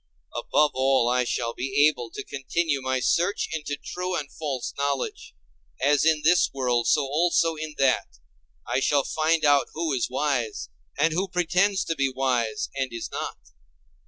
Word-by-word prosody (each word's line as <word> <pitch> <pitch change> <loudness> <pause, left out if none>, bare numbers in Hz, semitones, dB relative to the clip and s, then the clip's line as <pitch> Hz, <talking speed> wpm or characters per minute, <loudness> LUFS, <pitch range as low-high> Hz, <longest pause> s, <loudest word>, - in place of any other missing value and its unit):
Above 150 -1 +2
all, 130 -2 +2
I 125 +1 +2
shall 115 -1 -2
be 135 +3 +3
able 125 -6 -2
to - - -7
continue 145 +1 -1
my 130 0 -1
search 175 +9 +1
into 150 -2 -3
true 180 +4 -4
and 145 -2 -5
false 140 -5 -4
knowledge; 140 -1 -3 0.4
as 145 +1 +3
in 155 -2 +3
this 175 +2 +4
world, 125 -3 0
so 150 - +3
also 165 +3 +2
in 155 0 -6
that; 135 -2 +2 0.6
I - - +1
shall 140 +1 +2
find 160 +2 +1
out 145 -1 +4
who 160 -2 -1
is 125 -3 -1
wise, 125 - -1 0.3
and 155 +3 +2
who 185 +4 0
pretends 180 +2 +1
to 165 - -2
be 135 -2 0
wise, 125 -4 -1
and 135 -2 -2
is 115 -1 -6
not. - - -4
140 Hz, 165 wpm, -25 LUFS, 130-160 Hz, 0.6 s, this